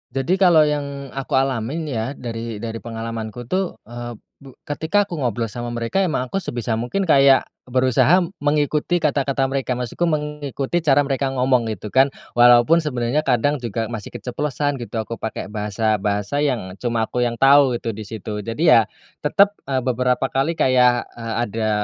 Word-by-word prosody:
Jadi 155 +8 0
kalau 175 -5 +6
yang 140 -2 -3
aku 135 -1 -3
alamin 135 +3 0
ya 130 -2 -3
dari 115 -3 -6
dari 115 0 -4
pengalamanku 115 0 -6
tuh, 185 +8 -2
eee, 120 +1 -7 0.2
bu 135 -2 -14
ketika 160 +7 0
aku 175 -5 -6
ngobrol 120 -3 -1
sama 120 +2 -5
mereka 120 +10 -1
emang 155 -9 0
aku - - -1
sebisa 120 - -3
mungkin 125 +12 -1
kayak 135 -2 +6 0.2
berusaha 130 +8 +3 0.2
mengikuti 150 +3 +1
kata-kata 140 -2 0
mereka 135 -2 -1
maksudku 125 +8 -2
mengikuti 150 -1 -2
cara 145 -3 +3
mereka 135 0 -1
ngomong 125 -2 +2
gitu 105 +3 -8
kan 135 +1 +5 0.3
walaupun 120 +6 +6
sebenarnya 145 -1 -1
kadang 135 +4 +2
juga 115 -1 -3
masih 110 -4 -6
keceplosan 140 +4 -2
gitu 120 -3 -8
aku 115 +1 -7
pakai 110 -1 -5
bahasa-bahasa 105 +1 -1
yang 115 -10 -1
cuma 115 -2 0
aku 125 0 0
yang 120 - -3
tahu 135 0 +5
itu 115 - -3
di 110 - -6
situ 105 -1 -6
jadi 115 +8 -3
ya, 155 -8 +7 0.5
tetap, 200 +7 +4 0.2
eee, 130 -1 0
beberapa 125 +1 0
kali 135 +5 +1
kayak, 125 -3 +3
eee, 115 -1 -4
ada 110 0 -2
130 Hz, 165 wpm, -21 LUFS, 115-145 Hz, 0.5 s, ya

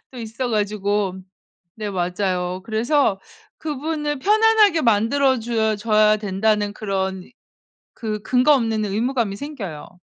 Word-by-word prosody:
또 255 - -9
있어 230 +2 -4
가지고 205 -3 -1 0.6
네 215 -1 -4
맞아요. 180 -1 -2
그래서 225 -1 +1 0.4
그분을 300 -1 -3
편안하게 425 0 +4
만들어 255 +3 +2
줘 220 -2 0
줘야 215 0 +3
된다는 205 0 0
그런 190 -3 -3 0.7
그 215 -2 -4
근거 255 +6 +3
없는 225 -4 0
의무감이 225 +1 -1
생겨요. 200 - -7
220 Hz, 255 characters per minute, -21 LUFS, 205-260 Hz, 0.7 s, 편안하게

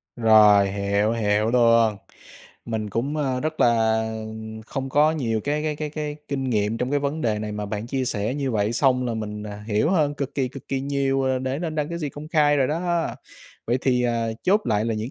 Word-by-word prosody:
Rồi, 105 -4 +6
hiểu, 100 +2 0
hiểu 105 -1 +1
luôn. 115 -3 +4 0.7
Mình 110 -2 -3
cũng, 130 +9 -2
ơ, 135 -4 -1
rất 155 +2 -3
là 115 -2 +3 0.7
không 135 0 -4
có 150 +3 +4
nhiều 115 -8 -1
cái 150 +1 -1
cái 155 -1 -2
cái 150 0 -4
cái 150 -1 -4
kinh 135 -1 -2
nghiệm 105 0 0
trong 125 - -2
cái 145 - +2
vấn 145 +3 -2
đề 110 -5 0
này 105 0 -4
mà 105 0 -4
bạn 105 +2 -4
chia 130 0 -2
sẻ 110 0 -2
như 140 -2 -2
vậy, 105 -1 0
xong 125 0 +2
là 120 - -2
mình, 105 -1 -5
à, 105 0 -8
hiểu 110 +8 +1
hơn 150 -6 +2
cực 140 -2 -4
kỳ, 130 -3 0
cực 135 0 -11
kỳ 135 - -1
nhiều, 135 -1 0
ờ, 130 -1 +1
để 130 +2 -2
nên 160 -2 -3
đăng 150 -1 -1
cái 170 0 -4
gì 150 -3 -3
công 145 +2 -9
khai 150 -3 +3
rồi 135 -2 +2
đó. 170 +2 0 0.6
Vậy 120 +2 +1
thì, 125 -2 +2
ờ, 115 -2 0
chốt 205 +4 +3
lại 105 -1 +1
là 115 - -1
những 110 +4 -4
125 Hz, 225 wpm, -24 LUFS, 110-145 Hz, 0.7 s, Rồi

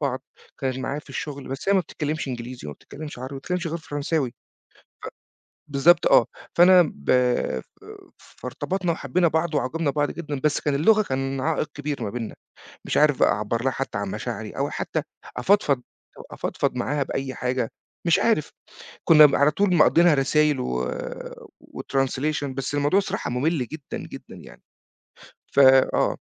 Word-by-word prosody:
ببعض، 135 -3 -2 0.4
كانت 130 -1 -2
معايا 140 +2 -3
في - - -12
الشغل 140 -2 -6
بس 135 +8 -5
هي - - +5
ما 190 - +4
بتتكلّمش 155 -4 -4
إنجليزي 125 - -6
وما 75 - -6
بتتكلّمش 150 -3 -10
عربي 130 +2 -6
ما - - -5
بتتكلّمش 180 +5 -3
غير 165 +1 -2
فرنساوي، 145 -3 -2
ف - - -28 1.4
بالضبط 160 +5 +4
آه، - - +6 0.3
فأنا 180 +1 +7
ب 70 - -4
ب 125 - +2 0.6
فارتبطنا 185 -2 -4
وحبينا 160 +2 +1
بعض 160 0 0
واعجَبنا 145 +3 0
ببعض 145 +1 0
جدًا، 150 -4 -5
بس 150 -1 +2
كان 145 -2 0
اللغة 215 +9 +4
كان 135 -4 -2
عائق 155 +1 -1
كبير 145 -3 -4
ما 105 - -2
بيننا، 115 +1 -5 0.5
مش - - -1
عارف 150 -2 +4
بَقى - - +5
أعَبّر 105 +3 -2
لها 130 - +2
حتّى 130 -4 -4
عن 100 -1 -3
مشاعري، - - -5
أو - - -2
حتّى - - -3 0.4
أفضفض 150 -10 +2 0.5
أفضفض - - -2
معاها 140 +3 -1
بأي 135 0 -4
حاجة، 125 -1 -1 0.4
مش 170 -1 +4
عارف. 225 -10 +1 0.5
كنا 155 -2 +9
م 140 - +1
على 145 +1 +4
طول 185 +4 +1
مقضينها 170 +1 +5
رسايل 150 0 +2
و 65 - -2 0.7
وtranslation، 135 +2 -2
بس 135 +2 -4
الموضوع 145 +7 +3
صراحة 195 0 -4
ممل 130 +2 0
جدًا، 155 -3 -7
جدًا - - -11
يعني، - - -14 0.9
ف - - +3
آه، 130 -1 +5
145 Hz, 160 wpm, -24 LUFS, 130-160 Hz, 1.4 s, كنا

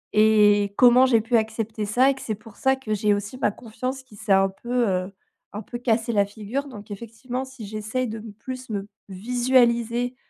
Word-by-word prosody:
Et 210 -1 +5
comment 250 +1 +7
j'ai 230 -3 +4
pu 230 +2 +2
accepter 220 -1 -2
ça 250 +6 +3
et - - -1
que 265 - -11
c'est 215 - -3
pour 215 0 -16
ça 265 0 +2
que 265 -5 -4
j'ai 210 0 +2
aussi 205 +5 -5
ma - - +2
confiance 255 +5 -6
qui 255 -5 -17
s'est 205 - -4
un 195 0 +5
peu, 240 +4 -1
heu, 185 0 -1 0.4
un 210 - -5
peu 240 - -7
cassé 235 -1 0
la 205 -3 +3
figure. 220 +7 -5
Donc 210 -6 -11
effectivement 235 +5 -6
si 265 -4 -10
j'essaye 215 +5 -3
de 220 0 -5 0.2
plus 255 +1 -7
me 200 -2 -4 0.2
visualiser 240 +3 +1
225 Hz, 200 wpm, -24 LUFS, 210-250 Hz, 0.4 s, comment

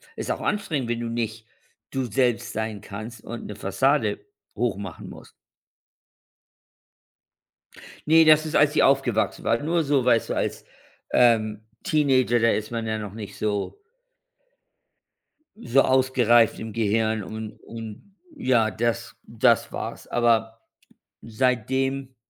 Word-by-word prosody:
Ist - - -3
auch - - -3
anstrengend, 155 - -2
wenn 120 0 -2
du 120 - -3
nicht 115 -1 -4 0.5
du 130 -1 -2
selbst 120 -1 0
sein 110 -1 -3
kannst 110 +3 -9
und 120 0 -7
'ne 105 - -7
Fassade 135 +10 +1 0.4
hochmachen 100 -7 -4
musst. - - -12 2.8
Ne, 160 +1 +7
das 155 0 +5
ist, 155 - -2
als 150 +1 +4
ich - - +4
aufgewachsen 135 -5 +1
war. 115 +4 +1
Nur 165 +1 0
so, 140 -2 +2
weißt 120 -2 +2
du, - - 0
als, - - -3 0.5
ähm, 110 -3 +3 0.2
Teenager, 130 -5 +2
da 115 - +3
ist 110 0 -2
man 115 -1 -3
ja 110 0 -1
noch 105 -2 -6
nicht 105 -2 -9
so 105 - -2 1.9
so 135 +3 +4
ausgereift 125 -4 +3
im 110 -1 -6
Gehirn 110 -1 0
und 110 +1 -7
und 115 - -10 0.2
ja, 120 - +2
das 115 +1 -2
das - - +2
war - - -4
es. - - -15
Aber, 115 -1 +1 0.6
seitdem, 130 +3 -1
115 Hz, 130 wpm, -24 LUFS, 110-130 Hz, 2.8 s, Ne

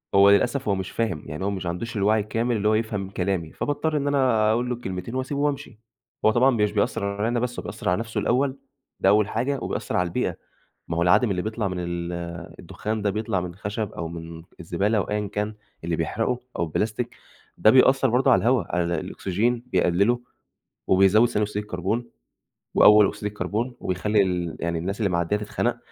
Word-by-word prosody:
هو 100 +1 +7
للأسف، 120 +5 +2
هو 100 - +2
مش 95 0 -4
فاهم 95 -10 -2
يعني 80 +4 -5
هو 100 - +1
مش 95 -2 -4
عندوش 95 +7 -4
الوعي 105 +2 +3
الكامل 115 +3 -1
اللي 105 0 0
هو 110 - +4
يفهم 105 -3 -1
كلامي، 90 -4 -2
فباضطر 150 +1 -1
إن 145 - -1
أنا 125 -6 +3
أقُول 120 +2 0
له 125 - 0
الكلمتين، 95 0 -6
وأسيبه 130 +2 -2
وأمشي، 140 -6 -2 0.5
هو 110 - +6
طبعًا 125 +4 +4
مش 105 -4 +2
بيأثر 100 -1 0
عليّا 100 +3 -1
أنا 120 - 0
بس، 125 0 -3
هو - - -6
بيأثر - - -4
على 90 +4 +1
نفسه 115 -1 -3
الأول، 130 +6 +1 0.4
ده 95 - +4
أول 105 0 +4
حاجة، 130 +5 -1
وبيأثر - - -2
على 90 - +1
البيئة، 85 - -1 0.5
ما 85 - -3
هو - - +1
العادم 90 +6 +4
اللي 90 -1 -1
بيطلع 110 0 -2
من 90 -1 -3
ال 85 0 -3 0.5
الدخّان 110 0 -4
ده، 100 - +1
بيطلع 105 -2 -1
من 90 - -4
الخشب 105 +3 -4
أو 85 - -5
من 80 0 -8 0.2
الزبالة 95 +6 0
أو 100 - +2
أيًا 105 0 -1
كان، 105 +1 -3 0.3
اللي 85 0 -1
بيحرقه 115 +9 -1 0.2
أو - - +1
البلاستيك، 105 +8 -2 0.4
ده - - +5
بيأثر 130 +1 +5
برضه 130 +3 +3
على - - +5
الهوا 120 -2 +2
على 90 - +2 0.2
الأكسجين 115 +9 -1
بيقلِّله، 100 +3 +2 0.7
وبيزود 95 +5 +5
ثاني 105 - 0
أكسيد 105 0 -3
الكربون، 105 +5 -2 0.7
وأول 105 -1 +7
أكسيد 105 - -7
الكربون 105 +4 -2
وبيخلّي 100 +3 +1
ال 90 -3 -2
يعني 85 -1 -1
الناس 100 +6 -4
اللي 100 -3 +1
معديّة 85 +3 0
تتخنق، 105 0 -2
105 Hz, 195 wpm, -24 LUFS, 90-115 Hz, 0.7 s, هو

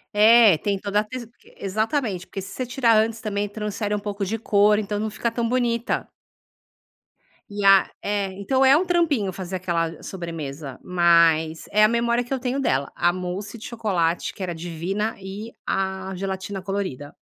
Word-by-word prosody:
É, 215 -5 +7
tem 200 -1 -1
toda 205 +1 0
a - - +1
te 235 +2 -7 0.3
exatamente, 215 - -1
porque - - -6
se 195 - -7
você 255 -2 -4
tirar 240 -3 +3
antes 220 +1 +1
também 205 -1 -2
transfere 210 0 -3
um - - -2
pouco 205 -1 -4
de 220 +4 -1
cor, 210 -1 +3
então 205 0 -2
não 215 0 -1
fica 230 +2 -2
tão 230 -1 -1
bonita. 240 -1 0 1.4
E 205 0 -4
a 195 -1 +6
é, 205 -1 -1
então 260 +6 +1
é 265 +1 +7
um 370 - +1
trampinho 300 - +1
fazer 185 0 -4
aquela 170 -2 -1
i 165 - -12
sobremesa, 155 -6 -6
mas, 170 -2 +3
é 210 +1 +5
a - - +8
memória 235 +1 +1
que 245 - -5
eu 265 - -1
tenho 255 +2 -2
dela. 140 - 0
A 175 - +3
mousse 185 +5 -5
de 220 - -10
chocolate, 180 -8 -1
que - - -12
era 175 -2 -3
divina 175 +6 -3
e 200 +4 -7 0.2
a 190 0 -2
gelatina 190 +1 -4
colorida. 190 -8 -4
205 Hz, 180 wpm, -23 LUFS, 185-225 Hz, 1.4 s, a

